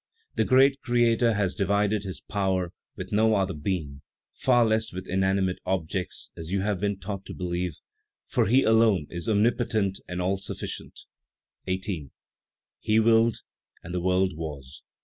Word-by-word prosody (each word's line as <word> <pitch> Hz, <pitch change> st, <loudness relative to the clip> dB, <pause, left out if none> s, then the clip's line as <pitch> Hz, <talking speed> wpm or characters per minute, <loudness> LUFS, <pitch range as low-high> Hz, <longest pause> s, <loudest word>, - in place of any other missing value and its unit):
"The -, -, +1 dB
great 135 Hz, +1 st, +4 dB
Creator 120 Hz, -1 st, +3 dB
has 100 Hz, -3 st, 0 dB
divided 100 Hz, +1 st, +1 dB
His 95 Hz, -, -6 dB
power 95 Hz, -3 st, -1 dB, 0.2 s
with -, -, -7 dB
no 110 Hz, +1 st, +3 dB
other 95 Hz, -1 st, 0 dB
being; 75 Hz, -3 st, -3 dB, 0.3 s
far 120 Hz, -2 st, +3 dB
less 110 Hz, 0 st, +1 dB
with 95 Hz, +1 st, -7 dB
inanimate 95 Hz, 0 st, +1 dB
objects, 90 Hz, 0 st, -3 dB
as 80 Hz, +1 st, -7 dB
you 100 Hz, 0 st, +1 dB
have 100 Hz, -2 st, -1 dB
been 100 Hz, 0 st, -1 dB
taught 100 Hz, 0 st, -6 dB
to -, -, -8 dB
believe, 90 Hz, -2 st, -3 dB, 0.5 s
for -, -, +1 dB
He 130 Hz, +5 st, +4 dB
alone 110 Hz, -7 st, +4 dB
is 85 Hz, +4 st, -4 dB
omnipotent 105 Hz, -2 st, +1 dB
and 90 Hz, 0 st, -4 dB
all 95 Hz, +2 st, 0 dB
sufficient. 95 Hz, -, -6 dB, 0.7 s
18. 95 Hz, -6 st, -3 dB, 0.7 s
"He 110 Hz, +1 st, +2 dB
willed, 115 Hz, 0 st, +3 dB, 0.4 s
and 85 Hz, -, -7 dB
the 90 Hz, -, -1 dB
world 95 Hz, 0 st, +1 dB
was. 70 Hz, -4 st, -7 dB
95 Hz, 150 wpm, -26 LUFS, 90-110 Hz, 0.7 s, great